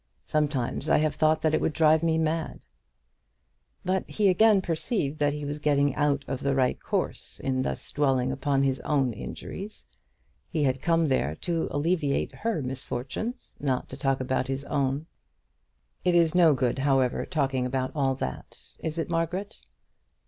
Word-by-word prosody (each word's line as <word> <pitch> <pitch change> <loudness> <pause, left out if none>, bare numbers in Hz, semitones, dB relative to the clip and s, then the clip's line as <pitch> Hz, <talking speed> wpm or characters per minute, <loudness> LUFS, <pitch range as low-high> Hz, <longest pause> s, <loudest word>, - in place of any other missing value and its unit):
Sometimes 145 -2 -1
I - - +5
have 155 0 +1
thought 155 0 +2
that 155 -1 +2
it - - +2
would 155 - 0
drive 155 -1 +4
me 165 -1 +2
mad!" 160 0 -1 1.2
But 185 +1 0
he 205 -2 +2
again 210 +2 +5
perceived 165 - -1
that 145 -1 +2
he 150 0 -5
was 145 +1 -4
getting 145 -2 +2
out 145 -1 +1
of 135 0 -3
the 140 -1 +1
right 130 -2 +1
course - - -3
in 130 -1 -1
thus - - -4
dwelling 130 -3 +1
upon 135 0 +1
his 135 -1 +1
own 135 -5 +1
injuries. 195 - -8 0.6
He 155 -4 0
had 130 -1 +1
come 165 0 +2
there 80 - +1
to 170 -2 -1
alleviate 145 -1 0
her 225 -9 -2
misfortunes, 130 - -5
not 130 -3 -1
to - - -7
talk 135 -1 0
about 130 0 -1
his 135 +1 -3
own. 140 +1 -1 1.0
"It 180 -1 +3
is 165 -2 +4
no 170 -5 +6
good, 125 0 0
however, 135 -2 +2
talking 135 -6 0
about 130 0 -1
all 135 -3 +1
that; 65 - -6 0.2
is 160 0 -4
it, 165 - -1
Margaret?" 175 +4 -2
145 Hz, 165 wpm, -27 LUFS, 135-165 Hz, 1.2 s, no